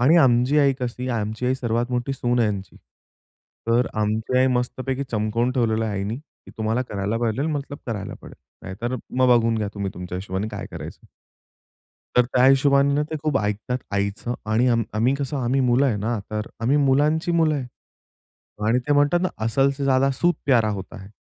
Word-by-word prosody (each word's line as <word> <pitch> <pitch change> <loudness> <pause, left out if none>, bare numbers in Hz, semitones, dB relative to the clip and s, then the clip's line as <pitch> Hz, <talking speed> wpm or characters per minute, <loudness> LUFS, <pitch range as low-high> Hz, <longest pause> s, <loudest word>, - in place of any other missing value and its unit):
आणि 145 +8 +5
आमची 130 -1 +4
आई 140 -2 +4
कशी, 125 +1 -3
आमची 110 0 -2
आई 130 - +2
सर्वात 120 -1 -1
मोठी 125 +2 -1
सून 125 -2 0
आहे 115 -3 +3
यांची. 100 -2 -5 0.9
तर 120 +2 +3
आमची 110 +4 0
आई 130 - +4
मस्तपैकी 130 +2 -2
चमकवून 115 +2 0
ठेवलेलं 115 -3 +1
आईनी, 100 +1 -3
की 145 +3 -16
तुम्हाला 110 +3 0
करायला 105 -2 -3
पाहिजेल 120 +4 0
मतलब 145 -2 -4
करायला 105 -5 -4
पडेल. - - -11 0.3
नाहीतर 120 +7 -4 0.2
मग 130 -1 +4
बघून 115 -1 +1
घ्या, 105 -1 -1
तुम्ही 100 -1 -3
तुमच्या 90 0 -6
हिशोबाने 95 +2 -3
काय - - -6
करायचं. - - -9 1.1
तर 125 - +6
त्या 125 +1 +2
हिशोबाने 140 +2 +4
ते 160 - -2
खूप 150 -3 +1
ऐकतात 105 +4 -2
आईचं 100 +4 -2 0.2
आणि 115 +3 +3 0.3
आम्ही 120 +5 +2
कसं 140 0 -3
आम्ही 130 +1 +1
मुलं 130 +2 +3
आहे 120 -6 +1
ना, 110 +3 -1
तर 105 0 -3
आम्ही 125 +5 +2
मुलांची 150 +4 +2
मुलं 160 -2 +3
आहे 135 -4 -3 1.0
आणि 120 +3 +3
ते - - +4
म्हणतात 145 +4 +3
ना, 185 - +2 0.2
"असल 135 +5 +2
से 140 - -3
ज्यादा 135 0 +3
सूद 175 +6 +2
प्यारा 120 -6 +4
होता 95 -2 -6
है." 95 - -13
125 Hz, 180 wpm, -23 LUFS, 110-135 Hz, 1.1 s, तर